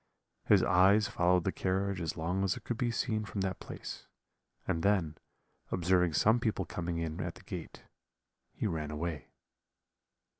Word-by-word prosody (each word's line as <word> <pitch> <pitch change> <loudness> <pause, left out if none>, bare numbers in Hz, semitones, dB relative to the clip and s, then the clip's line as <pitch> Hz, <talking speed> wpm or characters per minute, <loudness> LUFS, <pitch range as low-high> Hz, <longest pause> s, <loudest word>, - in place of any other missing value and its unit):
His - - +5
eyes 95 +3 +5
followed 90 0 +2
the 95 - 0
carriage 95 0 -1
as 80 -2 -3
long 90 +4 -1
as 95 -2 +1
it - - -11
could 120 -1 -3
be 120 - +1
seen 110 -2 -1
from 100 -1 -4
that 95 -2 -2
place; - - -8 0.6
and 80 - 0
then, 90 -5 +2 0.6
observing 90 -1 +2
some 110 +9 +4
people 110 -5 -1
coming 85 0 -3
in 80 -1 -3
at - - -4
the - - -14
gate, - - -7 0.7
he - - -4
ran 80 -6 -2
away. 75 0 -4
90 Hz, 160 wpm, -32 LUFS, 85-100 Hz, 0.7 s, His